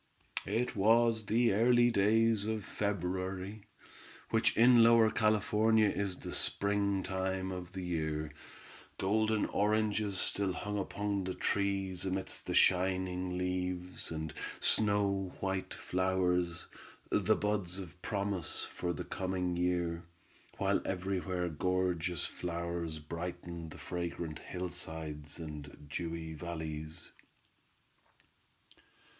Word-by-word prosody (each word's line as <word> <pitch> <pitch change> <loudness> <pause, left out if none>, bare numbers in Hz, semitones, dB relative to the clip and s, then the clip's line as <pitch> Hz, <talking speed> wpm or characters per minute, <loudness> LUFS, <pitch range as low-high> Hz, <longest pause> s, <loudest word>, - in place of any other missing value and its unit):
It 115 +5 0
was 110 +1 +4
the 115 0 +3
early 120 +3 +5
days 110 0 +3
of 110 -2 -2
February, 95 +1 -3 0.7
which - - +3
in 120 +1 +8
Lower 115 -1 +7
California 110 0 +3
is 100 -2 -2
the - - -7
spring 100 -1 +1
time 95 0 -2
of 90 -1 -6
the 95 -1 -4
year. 80 -3 -2 0.6
Golden 110 +2 +2
oranges 105 -1 +1
still 95 0 0
hung 105 +2 -3
upon 100 0 -1
the 95 - -3
trees 95 -2 0
amid 95 0 -2 0.2
the - - -2
shining 90 0 +2
leaves 90 0 -2
and 80 -1 -4 0.3
snow 100 -3 +2
white 95 -1 -2
flowers, 90 -2 0 0.5
the - - +3
buds 100 -4 -1
of 90 -2 -8
promise 100 -5 -2
for 85 -1 -2
the - - -4
coming 90 -1 -2
year, 85 -1 0 0.6
while - - +2
everywhere 90 -1 -1
gorgeous 90 0 0
flowers 85 -2 -3
brightened 85 +1 -6
the - - -10
fragrant 85 -2 -4
hillsides 80 -4 -5
and 75 -3 -8
dewy 80 +2 -4
valleys. 80 0 -6
95 Hz, 105 wpm, -33 LUFS, 85-100 Hz, 0.7 s, in